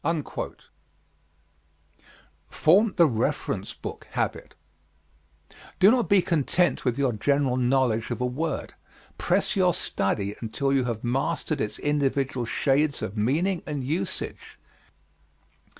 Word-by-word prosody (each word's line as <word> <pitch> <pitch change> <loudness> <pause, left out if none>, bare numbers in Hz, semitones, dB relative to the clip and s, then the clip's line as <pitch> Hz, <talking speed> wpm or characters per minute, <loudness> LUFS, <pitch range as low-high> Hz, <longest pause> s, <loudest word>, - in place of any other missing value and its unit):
Form 215 +4 +4
the 170 - +7
Reference 115 -7 -1
Book - - -8
Habit - - -3 1.2
Do 195 +3 +7
not 245 -1 +1
be 200 -3 +5
content 165 0 +1
with 125 -1 0
your 135 -3 +2
general 135 +4 +1
knowledge 125 -3 +1
of - - -3
a 125 - 0
word 150 +6 -3 0.5
press - - +1
your 180 -3 +3
study 100 +1 -1
until 135 +5 -1
you 135 -2 +2
have 115 -3 -3
mastered 140 +4 -1
its 105 - -2
individual 135 -4 0
shades 145 +3 +1
of 95 - -4
meaning 160 - +1
and 145 -3 -3
usage. 155 +7 -3
140 Hz, 115 wpm, -26 LUFS, 125-160 Hz, 1.2 s, the